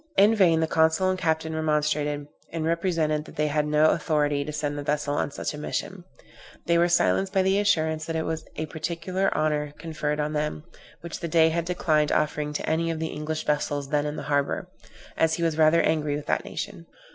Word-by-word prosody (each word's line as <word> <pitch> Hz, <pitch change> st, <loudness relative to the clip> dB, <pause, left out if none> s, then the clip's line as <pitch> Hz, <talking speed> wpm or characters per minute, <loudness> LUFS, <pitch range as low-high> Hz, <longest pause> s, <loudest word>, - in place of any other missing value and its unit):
In 205 Hz, +3 st, +6 dB
vain 175 Hz, -7 st, +4 dB
the -, -, +3 dB
consul 160 Hz, +4 st, +3 dB
and 185 Hz, -, -3 dB
captain 160 Hz, -2 st, 0 dB
remonstrated, 150 Hz, -2 st, 0 dB, 0.3 s
and 160 Hz, -1 st, -3 dB
represented 165 Hz, -3 st, 0 dB
that -, -, -13 dB
they 150 Hz, -, +1 dB
had 150 Hz, 0 st, 0 dB
no 150 Hz, +1 st, +4 dB
authority 145 Hz, -2 st, +1 dB
to 150 Hz, -, -5 dB
send 145 Hz, -1 st, -2 dB
the 145 Hz, -, -4 dB
vessel 145 Hz, 0 st, -1 dB
on 145 Hz, -, 0 dB
such -, -, -4 dB
a 150 Hz, -, -7 dB
mission; 180 Hz, +4 st, -4 dB, 0.6 s
they 170 Hz, -, +2 dB
were 175 Hz, -, +4 dB
silenced 190 Hz, +2 st, +2 dB
by 190 Hz, -2 st, +3 dB
the 190 Hz, +1 st, +2 dB
assurance 160 Hz, -6 st, +1 dB
that 165 Hz, -, -3 dB
it 160 Hz, -, -1 dB
was 160 Hz, 0 st, -3 dB
a 155 Hz, -, -3 dB
particular 170 Hz, +5 st, -2 dB
honor 150 Hz, -1 st, 0 dB
conferred 150 Hz, -1 st, -3 dB
on 150 Hz, +1 st, -1 dB
them, 150 Hz, 0 st, -2 dB, 0.4 s
which 170 Hz, -1 st, -6 dB
the 170 Hz, -, -3 dB
Dey 160 Hz, 0 st, +4 dB
had 170 Hz, +1 st, -1 dB
declined 155 Hz, -4 st, +1 dB
offering 150 Hz, 0 st, 0 dB
to -, -, -3 dB
any 165 Hz, +1 st, +1 dB
of 165 Hz, -, -2 dB
the 160 Hz, 0 st, -3 dB
English 150 Hz, +1 st, -4 dB
vessels 145 Hz, -1 st, -1 dB
then 150 Hz, 0 st, +1 dB
in 150 Hz, +1 st, -4 dB
harbor, 145 Hz, -1 st, -1 dB, 0.5 s
as 160 Hz, 0 st, +3 dB
he 170 Hz, -, -3 dB
was 165 Hz, -2 st, +1 dB
rather 160 Hz, +1 st, +4 dB
angry 150 Hz, -2 st, +1 dB
with 150 Hz, -, -5 dB
that -, -, 0 dB
nation. 85 Hz, -, -6 dB
155 Hz, 210 wpm, -26 LUFS, 150-165 Hz, 0.6 s, In